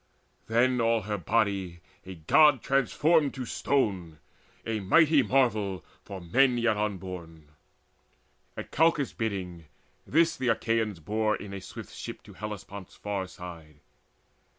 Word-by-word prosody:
Then 120 +2 +2
all 115 -1 +2
her 105 0 -3
body 95 -2 0 0.3
a 95 - -7
God 130 - +4
transformed 145 +3 +2
to 130 -2 -4
stone 95 - -1 0.5
A 115 -1 -2
mighty 150 - +4
marvel 110 -8 +1 0.2
for 95 - -8
men 125 +9 +3
yet 120 -2 +2
unborn! 90 -7 -5 1.1
At - - -7
Calchas' 160 -4 +2
bidding 95 -7 -4 0.4
this 165 +2 +3
the 130 - -3
Achaeans 115 -4 0
bore 110 +5 0
In 100 -1 -8
a 100 - -6
swift - - -10
ship - - -8
to - - -14
Hellespont's 100 -2 -8
far 100 -2 -4
side. 85 -4 -11
105 Hz, 130 wpm, -28 LUFS, 95-125 Hz, 1.1 s, God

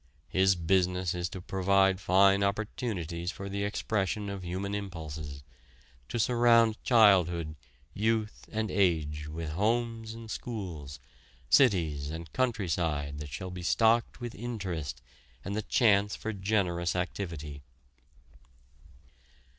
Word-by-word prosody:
His 95 0 +4
business 90 +1 +1
is 90 0 -2
to 95 - -7
provide 95 0 +2
fine 100 +2 +4
opportunities 100 - -2
for 100 - -7
the 100 +1 -2
expression 100 -1 -1
of 95 -2 -6
human 95 +3 -3
impulses 80 -8 -6 0.7
to - - -2
surround 115 -1 +4
childhood, 90 -9 +4 0.4
youth 110 0 -1
and 110 -2 -2
age 80 -6 +1
with 80 0 -5
homes 115 +4 -1
and 115 -1 -9
schools, 85 - -6 0.5
cities 75 - +3
and 80 +1 -7
countryside 85 - -1
that 75 -1 -6
shall 95 +6 -6
be 90 0 -7
stocked 115 +6 +2
with 120 -2 -5
interest 90 - -5 0.4
and 100 +1 -3
the 110 - 0
chance 105 -2 +3
for 110 - -4
generous 95 -4 0
activity. 85 -6 -4
95 Hz, 115 wpm, -30 LUFS, 85-110 Hz, 0.7 s, His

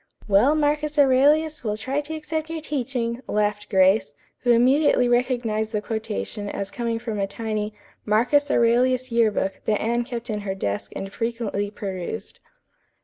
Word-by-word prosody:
'" - - -57
"Well, 215 +9 +4
Marcus 300 0 0
Aurelius, 290 +3 +4
we'll 210 -2 -2
try 265 +7 -2
to 310 +2 -6
accept 315 +1 -4
your 330 0 -3
teaching," 250 -5 -2
laughed 210 0 -1
Grace, 190 -6 +3 0.2
who 245 - -2
immediately 250 +2 +4
recognized 240 -3 0
the 210 - +1
quotation 210 - -4
as 200 -1 -4
coming 235 -1 -2
from 225 -2 -4
a 195 - 0
tiny 215 0 -3 0.3
"Marcus 250 +7 +2
Aurelius 250 +1 +2
Year 230 -1 +4
Book" 195 -2 -2
that 210 -1 +1
Anne 235 +2 0
kept 240 -1 -5
in 210 - -2
her 195 -2 -4
desk 100 - -3
and 195 +1 -6
frequently 230 -3 -2
perused. 185 - -6
230 Hz, 160 wpm, -24 LUFS, 210-260 Hz, 0.3 s, Well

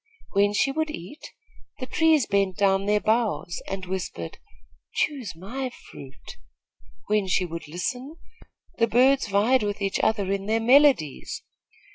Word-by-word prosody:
When 205 0 +3
she 275 +5 +2
would 315 +2 -1
eat, 290 - -9 0.5
the 260 - -5
trees 320 -1 +3
bent 195 -2 0
down 195 0 +2
their 210 0 +3
boughs, 220 -5 0
and 190 -1 -5
whispered, 180 - -5 0.6
'Choose 265 - -1
my 255 +10 -5
fruit.' 140 - -13 0.7
When 210 -2 +1
she 185 0 +1
would 165 -2 -7
listen, 250 - -4 0.6
the 230 - +4
birds 260 +3 +3
vied 220 +6 +3
with 205 -1 -2
each 195 -1 -1
other 200 -3 +1
in 195 0 -2
their 220 +1 +2
melodies. 250 - +3
210 Hz, 140 wpm, -25 LUFS, 190-260 Hz, 0.7 s, the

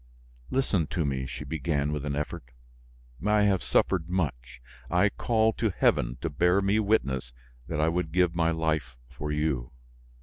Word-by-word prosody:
"Listen 105 - +1
to 80 -2 -1
me," 65 -2 -2
she 75 - -6
began 75 0 -1
with 75 -1 -3
an 70 -1 -2
effort. 75 -4 -4 0.8
"I 105 0 +3
have 100 -3 +3
suffered 90 -3 +1
much, 65 -9 -2 0.3
I 90 +4 +3
call 110 +1 +1
to 110 - 0
heaven - - +1
to 85 - -1
bear 90 +6 +3
me 100 +2 +2
witness 65 - 0 0.3
that - - -3
I 80 - +3
would 85 -1 -1
give 90 0 +2
my 85 -1 +2
life 80 -6 -1
for 75 +3 -5
you. 75 -6 -1
80 Hz, 165 wpm, -28 LUFS, 70-95 Hz, 0.8 s, I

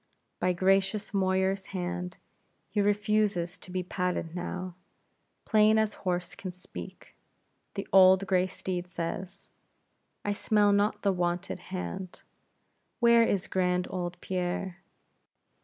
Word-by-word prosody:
By 180 0 +2
gracious 195 +3 +2
Moyar's 190 0 +1
hand, 180 0 -4 0.5
he 210 - +1
refuses 205 -3 +1
to - - -14
be 180 0 -2
patted 180 -2 -2
now; 180 +1 -4 0.7
plain 215 0 +5
as 220 -1 +2
horse 180 -2 -2
can 185 - -6
speak, 180 +1 -10 0.6
the 195 - -4
old 190 0 +7
gray 185 -1 +2
steed 185 -1 -4
says 180 +3 -5 0.8
"I 205 - +1
smell 205 0 +3
not 205 +1 +1
the 200 -2 +3
wonted 175 +1 -1
hand; 185 0 -5 0.8
where 235 -1 +6
is 200 -5 +2
grand 180 -1 +1
old 175 -1 -4
Pierre? 180 0 -3
185 Hz, 120 wpm, -29 LUFS, 180-200 Hz, 0.8 s, old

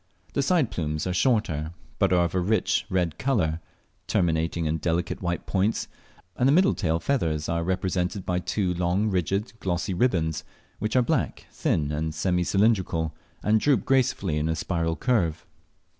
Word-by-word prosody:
The 140 - +1
side 150 -3 +2
plumes 75 -2 -2
are 90 - -1
shorter, 90 - +1 0.3
but - - +3
are 90 -1 +4
of 85 - -3
a 95 - +1
rich 100 +2 +1
red 90 -4 0
colour, 90 -12 +1 0.5
terminating 80 0 +1
in 80 +1 0
delicate 85 +2 -1
white 85 -1 -2
points, 100 +3 0 0.5
and 125 - +2
the - - +5
middle 185 +6 +5
tail 80 -4 0
feathers 80 - 0
are 85 0 0
represented 95 +1 -1
by 90 0 0
two 90 0 -1
long 90 +4 0
rigid 95 +5 -1
glossy 90 +1 -1
ribands, 85 -7 +1 0.4
which 110 +3 -2
are 125 - +5
black, - - -1
thin, 75 -2 0
and 80 +1 -2
semi 90 +2 +1
cylindrical, 95 -6 +1 0.3
and 110 +1 +3
droop 135 -4 +2
gracefully 100 - +1
in 75 +2 -1
a 80 - +1
spiral 80 0 -1
curve. 85 -7 0
90 Hz, 165 wpm, -26 LUFS, 80-105 Hz, 0.5 s, the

